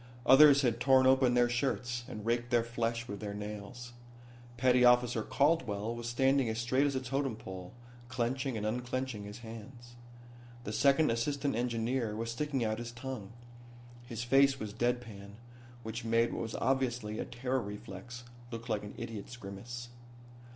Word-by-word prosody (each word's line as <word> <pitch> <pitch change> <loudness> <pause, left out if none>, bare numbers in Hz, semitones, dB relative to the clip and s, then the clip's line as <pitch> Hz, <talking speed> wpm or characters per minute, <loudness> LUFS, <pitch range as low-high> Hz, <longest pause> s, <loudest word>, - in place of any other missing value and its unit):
Others 140 +1 +8
had 120 -2 +1
torn 130 +1 +5
open 130 -1 +4
their 120 0 +5
shirts, 120 -1 -1
and 105 -1 -7
raked 120 +1 0
their 120 -2 +3
flesh 115 0 -2
with 100 -1 -6
their 100 0 -5
nails. 105 +4 -7 0.6
Petty 125 0 +4
officer 125 -2 +5
Caldwell 125 -5 +1
was 120 0 -5
standing 130 +1 +2
as 110 - -2
straight 130 +5 +2
as 140 - -2
a - - +1
totem 135 -1 -2
pole, 95 -4 -8 0.4
clenching 130 0 -1
and 105 - -3
unclenching 120 -1 -3
his 105 +3 -9
hands. 120 +2 -10 0.7
The 105 - -5
second 140 +3 +4
assistant 140 +3 -1
engineer 120 -1 -1
was 115 +1 -3
sticking 135 0 -1
out 110 +1 -1
his 120 0 -5
tongue. 120 -4 -7 0.7
His 120 -1 -4
face 135 +2 +4
was 105 -3 -5
deadpan, 115 -4 -3 0.5
which 110 +2 -5
made 115 +1 +2
what - - -3
was 115 -1 -4
obviously 120 -4 0
a - - -2
terror 125 +2 -2
reflex 105 +3 -8 0.3
look 115 0 -7
like 105 -2 0
an 105 - -8
idiot's 115 0 -7
grimace. 120 +4 -8
120 Hz, 160 wpm, -32 LUFS, 110-130 Hz, 0.7 s, Others